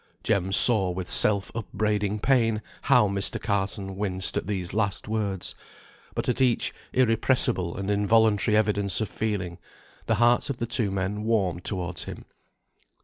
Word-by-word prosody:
Jem 95 -1 0
saw 100 -2 +4
with 90 0 -5
self 100 -2 +2
upbraiding 105 -2 -2
pain 115 -4 +2 0.2
how 125 -6 +5
Mr. 100 0 -2
Carson 100 -2 -2
winced 95 -2 -1
at - - -2
these 95 -4 -3
last 100 -1 -1
words, 105 -4 -3 0.6
but - - -2
at 125 - 0
each 125 -3 +1 0.2
irrepressible 115 -6 +2
and 100 +1 -2
involuntary 105 +1 +3
evidence 100 -3 +1
of 110 - -2
feeling, 95 -6 -3 0.5
the 115 - +2
hearts 120 +5 +3
of 135 - -3
the 120 - -2
two 110 -2 0
men 95 +2 -2
warmed 100 -6 0
towards 90 -4 -3
him. - - -9
105 Hz, 145 wpm, -26 LUFS, 95-110 Hz, 0.6 s, how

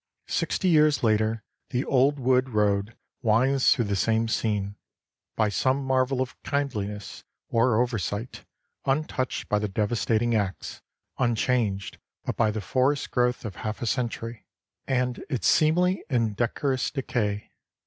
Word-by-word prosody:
Sixty 190 - 0
years 155 -4 +4
later 110 0 +2 0.3
the 125 +2 -1
old 140 +2 +3
wood 130 0 +2
road 105 -1 0 0.2
winds 130 +4 +3
through 120 -5 +3
the 100 -1 -1
same 115 +3 +1
scene, 105 -3 -1 0.6
by 110 -1 +2
some 130 +6 +1
marvel 130 0 +1
of 130 - -12
kindliness 105 -8 -3 0.3
or 115 -1 +3
oversight, 115 -1 -2 0.4
untouched 135 -2 -1
by 105 - +1
the 105 - -1
devastating 110 +3 0
axe, 100 -3 -2 0.4
unchanged 115 -5 0 0.3
but - - -2
by 110 -2 +2
the 105 0 -3
forest 130 +8 0
growth 125 -1 +1
of 100 -5 -6
half 105 0 -4
a - - -3
century 115 -2 -3 0.4
and 125 -2 0
its 130 -6 0
seemly 180 +4 +3
and 115 -6 +1
decorous 130 +3 0
decay. 105 -7 -2
120 Hz, 135 wpm, -26 LUFS, 105-130 Hz, 0.6 s, years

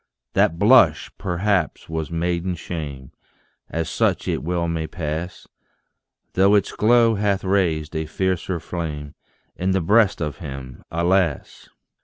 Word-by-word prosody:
That 80 - +2
blush, 100 - +5
perhaps, 95 +1 -1
was 80 -1 -3
maiden 85 +2 -1
shame 75 -6 -6 0.6
As 80 -1 -2
such - - 0
it - - -1
well 85 +1 -1
may 80 -1 -2
pass 80 +2 -5 0.9
Though 100 +2 +4
its 100 - +2
glow 115 +1 +4
hath 100 -2 0
raised 85 -5 0
a 80 0 -2
fiercer 90 +1 -1
flame 75 -4 -5 0.4
In 95 +1 0
the 95 - +2
breast 105 +4 +3
of 75 -1 -4
him, 65 -6 -8
alas! 85 -1 0
85 Hz, 130 wpm, -22 LUFS, 80-95 Hz, 0.9 s, blush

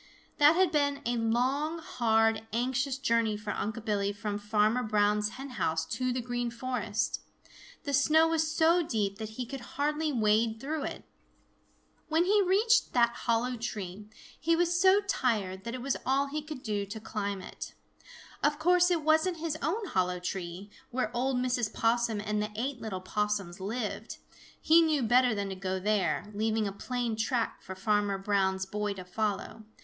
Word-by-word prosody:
That 295 +2 +7
had 370 -1 +3
been 285 -2 +1
a 240 +1 0
long, 255 +8 0
hard, 225 -7 +1
anxious 260 +3 0
journey 230 -5 +1
for 210 0 -5
Unc' 220 +2 -4
Billy 200 -2 0
from 205 0 -4
Farmer 210 +3 +2
Brown's 210 -2 +2
hen 270 +1 -7
house 160 0 +1
to 255 +9 -2
the 250 0 -1
Green 245 0 -2
Forest. 235 -3 -2 0.6
The 285 -3 -3
snow 310 +4 +5
was 320 -1 +1
so 330 +2 +4
deep 210 -9 -2
that 220 0 -7
he 250 - -2
could 270 +3 -6 0.2
hardly 300 +2 0
wade 220 -1 +2
through 295 +3 -3
it. - - -6 1.0
When 320 +2 +2
he 410 +2 +4
reached 410 +5 +3
that 235 -1 +4 0.2
hollow 240 +2 +2
tree, 210 -3 -5 0.3
he 335 0 +2
was 350 +1 +1
so 385 +2 +6
tired 210 - -1
that 235 +1 -4
it 250 - -6
was 275 - 0
all 270 +2 +2
he 295 +2 -4
could 300 -3 -8
do 205 -3 -2
to 205 +3 -6
climb 205 -2 -3
it. 185 - -8 0.7
Of 295 0 +2
course 355 +2 +4
it 340 -3 +1
wasn't 315 +3 +3
his 320 -1 -2
own 395 +9 -1
hollow 180 - 0
tree, 180 +2 -5 0.2
where 245 -2 -2
old 255 +1 +1
Mrs. 250 -3 0
Possum 230 -1 +1
and 210 0 -1
the 210 - -2
eight 250 +3 -3
little 190 -4 -4
Possums 200 -1 -2
lived. 210 +4 -4 0.4
He 325 +2 +6
knew 310 -5 +2
better 245 0 +4
than 200 -1 -2
to 190 - -4
go 190 0 -3
there, 195 -5 0
leaving 220 +1 0
a - - -3
plain 240 +3 -3
track 230 +2 -1
for 190 - -8
Farmer 205 +1 +1
Brown's 195 -1 0
boy 210 +1 -2
to 185 -1 -8
follow. 210 +3 -3
230 Hz, 175 wpm, -30 LUFS, 210-285 Hz, 1.0 s, That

